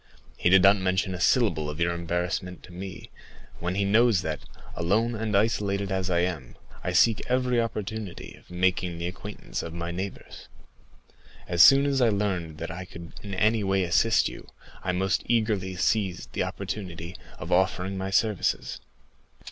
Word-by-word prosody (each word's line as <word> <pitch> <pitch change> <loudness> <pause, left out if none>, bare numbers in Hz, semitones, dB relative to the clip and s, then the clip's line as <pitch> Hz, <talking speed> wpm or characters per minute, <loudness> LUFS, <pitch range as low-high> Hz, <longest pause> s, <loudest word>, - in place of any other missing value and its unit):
He 85 - +1
did 95 0 +6
not 100 +1 +7
mention 95 0 0
a 90 - -5
syllable 100 - +2
of 75 +2 -6
your 85 0 +2
embarrassment 90 +1 -3
to 90 - -13
me, 95 0 -8 0.5
when 90 +2 -2
he 100 0 +1
knows 110 -2 +4
that, 80 -3 -3 0.4
alone 105 +8 +1
and 110 -2 0
isolated 100 -2 0
as 95 -1 -1
I 85 -1 +2
am, 85 -8 -3 0.3
I - - -1
seek 115 -3 +4
every 125 -1 +2
opportunity 110 -3 -5
of - - -19
making 90 -1 0
the 85 - -4
acquaintance 90 -8 -6
of 85 0 -7
my 85 0 -4
neighbors. 95 +3 -7 1.0
As 85 -1 +2
soon 135 +7 +8
as 140 -2 +1
I 120 - +5
learned 95 -7 -2
I 90 +2 -5
could 85 -2 -11
in 100 -2 -6
any 110 +2 +2
way 95 -1 +1
assist 110 +6 +3
you, - - -9 0.4
I 90 - 0
most 95 +1 0
eagerly 105 -5 0
seized 95 -1 -1
the - - -1
opportunity 90 -4 -6 0.2
of - - -7
offering 95 +1 +1
my 95 0 -3
services." 105 0 0
95 Hz, 165 wpm, -27 LUFS, 90-105 Hz, 1.0 s, soon